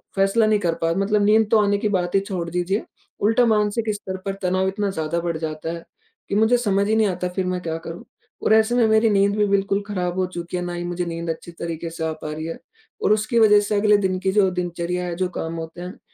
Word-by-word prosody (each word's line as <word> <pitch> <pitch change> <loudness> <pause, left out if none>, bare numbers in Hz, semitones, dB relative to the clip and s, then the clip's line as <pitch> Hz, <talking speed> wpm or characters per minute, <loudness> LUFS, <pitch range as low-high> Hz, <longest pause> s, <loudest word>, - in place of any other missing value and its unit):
फैसला 195 +3 +3
नहीं 215 -1 +3
कर 170 -4 0
पा 165 - +2
मतलब 205 +1 +2
नींद 215 +1 +4
तो 220 - +6
आने 205 0 +2
की 210 +1 -1
बात 180 -1 -1
ही - - +6
छोड़ 180 -4 -4
दीजिए। 180 +4 -1 0.4
उल्टा 225 +4 +3
मानसिक 215 0 +1
स्तर 190 -2 -6
पर 195 - -1
तनाव 185 +1 +1
इतना 200 +1 -1
ज़्यादा 160 -1 -2
बढ़ 170 -2 -2
जाता 160 0 -4
है, 170 - -7 0.5
कि 200 - -1
मुझे 220 +3 +4
समझ 200 -3 +1
ही 220 - +2
नहीं 220 -1 +3
आता 180 -1 -2
फिर 185 +1 -2
मैं 180 0 -2
क्या 165 -2 -3
करूँ? 165 +1 -8 0.4
और 220 - +4
ऐसे 220 +2 +4
में 240 -2 +4
मेरी 220 +1 +4
नींद 200 0 +3
भी 210 - +3
बिल्कुल 200 0 +1
खराब 180 -3 -2
हो 185 - +2
चुकी 170 +1 -4
है, 180 - -3
ना 175 0 -4
ही 175 - -4
मुझे 175 0 -3
नींद 170 0 -4
अच्छी 165 +1 -5
तरीके 170 0 -5
से 165 0 -4
आ - - -1
पा 155 - -5
रही 155 +1 -5
है 165 - -5 0.5
और 215 - +4
उसकी 225 +3 +1
वजह 210 -2 +7
से 205 +1 -1
अगले 210 0 +4
दिन 190 -2 0
की 190 0 0
जो 195 -2 +3
दिनचर्या 175 0 -3
है, 175 -1 -3
जो 185 +1 0
काम 165 -2 -4
होते 165 +1 -7
हैं, 180 +1 -8
190 Hz, 255 wpm, -22 LUFS, 170-210 Hz, 0.5 s, वजह